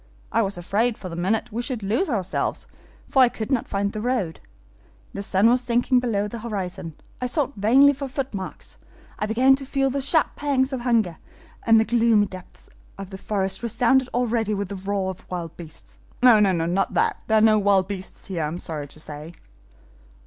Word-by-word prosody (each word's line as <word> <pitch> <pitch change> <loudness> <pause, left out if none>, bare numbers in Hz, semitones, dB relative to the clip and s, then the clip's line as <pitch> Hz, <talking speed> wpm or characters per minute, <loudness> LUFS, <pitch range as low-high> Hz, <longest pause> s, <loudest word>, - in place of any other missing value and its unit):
I 230 - +2
was 195 -3 -2
afraid, 215 +6 0
for 185 - -7
the 165 - -7
minute, 215 +7 -1
we 230 +3 -2
should 240 -3 -4
lose 230 - 0
ourselves, 195 -7 -2 0.4
for 265 - +3
I 250 - +7
could 220 +1 -6
not 255 -4 0
find 200 0 -1
the 215 - -4
road. 225 - -1 0.7
The 200 - -4
sun 200 +1 +3
was 245 +2 +4
sinking 245 +1 +2
below 215 -5 -1
the 230 +3 -7
horizon; 185 -7 -5 0.3
I 250 - 0
sought 280 +1 -1
vainly 260 +8 +5
for 275 0 -5
footmarks; 255 -8 -6 0.4
I 210 - -1
began 255 +5 +4
to 275 - -6
feel 270 0 0
the 275 +1 -2
sharp 310 +3 +2
pangs 275 -2 0
of 255 - -3
hunger, 225 -9 +1 0.5
and 225 -1 +7
the 220 - +2
gloomy 230 -3 +3
depths 185 -2 -12 0.3
of 195 -1 -8
the 190 - -8
forest 195 -1 -2
resounded 245 +2 +2
already 230 -3 0
with 200 -2 -3
the 200 - -5
roar 195 0 -2
of 185 - -14
wild 170 -2 -5
beasts. 160 -2 -11 0.2
No, 240 -4 +8
not 180 -2 +1
that; - - +1
there 220 - +3
are - - +4
no 215 -1 +5
wild 195 -2 +3
beasts 190 -2 -7
here, 185 -4 -3
I 150 - 0
am 160 +3 -4
sorry 155 -5 -5
to 155 - -10
say." 155 +2 -6
215 Hz, 200 wpm, -23 LUFS, 190-245 Hz, 0.7 s, No